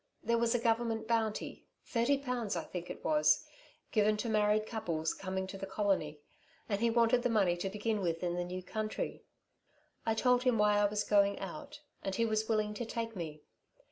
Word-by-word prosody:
There 235 0 +2
was 235 +1 +2
a - - +2
Government 225 -1 0
bounty 225 -2 -1 0.2
thirty 240 +4 +2
pounds 250 -6 -2
I - - -2
think 180 -1 -6
it - - -8
was 150 -1 +3 0.5
given 215 0 +3
to 230 +2 -2
married 215 0 +3
couples 165 -9 -2
coming 190 0 -3
to 195 +1 -8
the 195 - -5
colony, 190 -7 0 0.5
and 200 0 -1
he 235 - +4
wanted 235 +1 +3
the 245 - +1
money 200 -6 +3
to 190 +2 -2
begin 210 +1 -1
with 170 -1 -1
in 175 -1 0
the 175 0 -1
new 180 +1 -5
country. 215 +3 -3 0.8
I 225 - +1
told 250 +1 +3
him 250 -2 +2
why 210 0 +4
I 205 - +4
was 205 0 0
going 200 -1 +3
out, 290 +8 -7 0.2
and 195 -1 -3
he 230 - +2
was 220 0 0
willing 215 -1 +1
to 225 - -4
take 230 -1 -3
me. 155 -4 -6
210 Hz, 200 wpm, -33 LUFS, 190-230 Hz, 0.8 s, he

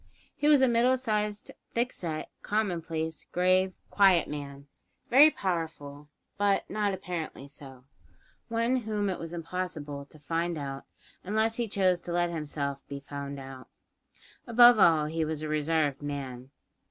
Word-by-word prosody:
He 295 - 0
was 290 -3 +6
a - - +6
middle 245 +2 +3
sized, 210 -4 -2 0.2
thick 240 +2 +1
set, 160 -3 -5
commonplace, 165 -6 -2
grave, 185 +1 +2 0.2
quiet 190 -4 +5
man; 140 -1 -7 0.5
very 285 +5 +9
powerful 160 - -4 0.3
but 200 -1 +2
not 210 -1 0
apparently 175 -7 -5
so; 135 -3 -13 0.6
one 230 +2 +1
whom 210 -4 -1
it 180 - -4
was 165 -1 -6
impossible 165 -4 -5
to 150 - -16
"find 165 +3 -2
out" 135 -2 -6 0.4
unless 220 +3 0
he 240 -1 -1
chose 185 -3 +1
to 170 - -5
let 175 0 +1
himself 145 -3 -4
be 140 -1 -6
found 140 0 -7
out. 130 -1 -10 0.8
Above 240 -1 +7
all, 160 -5 +5
he 160 +1 -1
was 155 -1 -3
a - - -3
reserved 150 -2 0
man. 135 -3 -6
170 Hz, 145 wpm, -29 LUFS, 145-210 Hz, 0.8 s, very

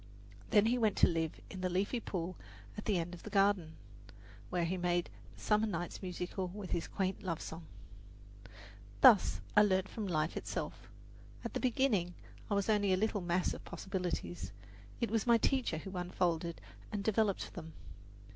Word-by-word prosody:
Then 205 0 +5
he 245 +2 +2
went 215 -3 +3
to - - +7
live 165 -2 -1
in 185 - -6
the 185 - 0
leafy 195 +7 0
pool 185 -4 -4 0.4
at - - -7
the 205 -4 +2
end 170 +1 -2
of 175 - -9
the - - -8
garden, 195 -5 +2 0.7
where 175 -2 0
he 175 +3 -1
made 175 - 0 0.2
the - - -17
summer 210 - +2
nights 175 -4 -4
musical 180 0 -3
with 195 +1 -7
his 170 - -1
quaint 190 -1 -2
love 170 -6 -2
song. 160 0 -7 1.3
Thus 205 - +7
I 210 - +9
learned 190 -2 +3
from 215 -3 -4
life 155 -2 0
itself. - - -4 0.6
At - - -3
the - - -1
beginning 225 -9 +1 0.3
I 205 - +1
was 200 -1 +1
only 205 -3 +3
a - - +3
little 210 0 0
mass 175 +1 +1
of - - -8
possibilities. 180 -2 -4 0.5
It 235 -3 -1
was 225 0 +1
my 235 -1 +7
teacher 245 -7 +1
who 195 +4 -7
unfolded 175 -2 -1 0.3
and 205 -2 -2
developed 215 -2 +1
them. 160 -2 -8
185 Hz, 175 wpm, -34 LUFS, 175-210 Hz, 1.3 s, I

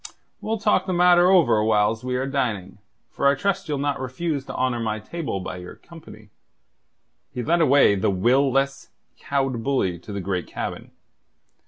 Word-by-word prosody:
We'll 225 +1 -2
talk 210 -1 +1
the 185 - -1
matter 175 0 +5
over 120 - +4
whiles 110 +1 +1
we 125 0 -2
are 130 +1 -1
dining, 110 -9 -3 0.3
for 140 - 0
I 140 - +4
trust 185 +2 -2
ye'll 145 - -1
not 140 0 -1
refuse 135 +3 -3
to - - -8
honour 130 -2 0
my 110 -2 -2
table 135 - -5
by 95 0 -6
your 90 0 -10
company." 130 -11 -15 1.0
He 125 - -4
led 170 +6 +2
away 140 -7 +5
the 100 0 0
will 125 +9 +2
less, 135 +1 -1 0.3
cowed 135 -4 -2
bully 105 -11 0
to 95 - -11
the 100 - -4
great 90 -1 -3
cabin. - - -6
130 Hz, 175 wpm, -23 LUFS, 105-145 Hz, 1.0 s, matter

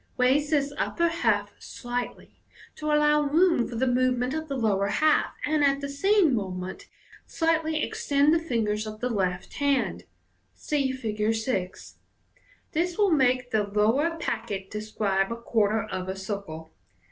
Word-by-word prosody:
Raise 270 +4 +3
this 285 -2 +1
upper 340 -1 +1
half 335 0 0
slightly, 245 0 -6 0.4
to 305 - -5
allow 300 0 +4
room 305 -2 +3
for 240 - -7
the 250 +3 +1
movement 250 0 +1
of 315 0 -3
the 275 -2 -3
lower 200 -4 +1
half, 310 +9 +2
and 300 -1 +1
at 275 -1 +3
the 280 - -4
same 350 +3 +3
moment 190 - -4 0.4
slightly 320 -1 0
extend 285 +2 +2
the 330 - +3
fingers 220 -8 -1
of 215 0 -7
the 250 +1 -2
left 185 -4 -2
hand 280 -2 0 0.5
(See 280 -3 -1
Fig. 220 -4 -1
6.) 220 -5 -4 0.7
This 340 +2 -1
will 410 -3 +3
make 255 -4 +2
the 220 - +2
lower 225 +11 +1
packet 215 - -4
de* 210 - -4
scribe 200 -2 -1
a - - -2
quarter 220 -2 +1
of 185 0 -5
a 190 - -3
circle. 190 -5 -6
250 Hz, 155 wpm, -26 LUFS, 210-300 Hz, 0.7 s, allow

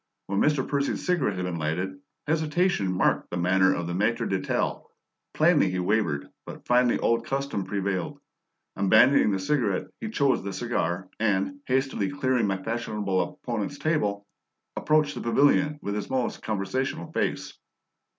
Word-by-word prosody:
When 100 0 -1
Mr. 145 -3 +2
Percy's 140 -1 -1
cigarette 160 - +1
had 90 0 -3
been 90 -2 -3
lighted, 90 +5 -2 0.3
hesitation 155 - +1
marked 90 - +1
the 90 - -3
manner 95 +2 +3
of 85 - -3
our 85 - -3
maitre 105 +6 0
d'hotel; 95 -1 -2 0.5
plainly 155 - +4
he 90 - -2
wavered, 90 -7 0 0.2
but - - -10
finally 125 0 +3
old 115 0 +1
custom 135 -8 -2
prevailed; 100 -2 -2 0.6
abandoning 100 +7 +5
the 100 - +1
cigarette, 100 -1 0
he 220 - -4
chose 140 -11 +2
the 100 0 -4
cigar, 95 -5 -2
and, 95 -3 0
hastily 130 -6 0
clearing 130 -5 0
my 95 -1 0
fashionable 105 -2 -2
opponent's 120 +3 -4
table, 105 -12 -1 0.5
approached 155 -1 +2
the - - -6
pavilion 145 +5 +3
with 100 - -2
his 105 0 -4
most 130 -2 -1
conversational 110 0 -3
face. - - -2
105 Hz, 150 wpm, -26 LUFS, 95-140 Hz, 0.6 s, abandoning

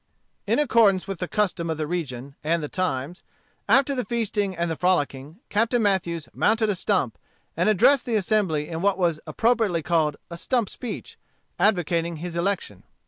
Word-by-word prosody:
In - - +2
accordance 220 -9 +3
with 195 -3 -5
the 180 - -2
custom 180 -5 -1
of 160 - -2
the 155 - -2
region 140 -6 -4
and 165 +1 0
the - - -2
times, 175 -1 -3 0.5
after 270 +5 +4
the 250 -2 -1
feasting 210 -4 -1
and 170 0 0
the - - -1
frolicking, 155 -2 -1
Captain 230 +3 +2
Mathews 175 -6 0
mounted 220 0 +2
a - - -1
stump, - - 0 0.4
and - - +2
addressed 235 +6 +4
the 235 - -1
assembly 190 -7 +1
in 165 -1 -5
what 200 0 +2
was 170 -4 +1
appropriately 225 -8 +1
called 155 -3 +1
a 170 - -6
stump 240 -2 0
speech, 245 - -7 0.4
advocating 170 -4 +1
his 170 +2 -6
election. 170 - -2
180 Hz, 170 wpm, -24 LUFS, 165-215 Hz, 0.5 s, after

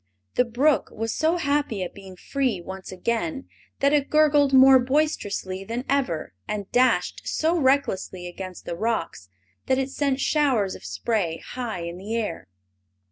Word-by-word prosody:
The 250 - +3
brook 265 +6 +2
was 225 +1 -3
so 320 +3 +1
happy 285 - 0
at 180 - -6
being 190 -1 -11
free 255 0 -1
once 190 +2 -8
again 180 - -2 0.3
that 280 +1 +4
it 285 -2 +2
gurgled 295 -2 +4
more 265 0 +8
boisterously 245 -9 -1
than 235 +5 -4
ever 255 - -1
and 205 -2 -3
dashed 250 +1 +2
so 325 +2 +1
recklessly 260 - +1
against 185 +1 -8
the 170 - -4
rocks 215 - -2 0.4
that 260 - +3
it 270 0 -1
sent 275 -1 0
showers 265 -10 +2
of - - -10
spray 200 -9 -1
high 235 -8 -5
in 170 +1 -6
the 210 +4 -4
air. 210 - -3
235 Hz, 155 wpm, -24 LUFS, 190-275 Hz, 0.4 s, more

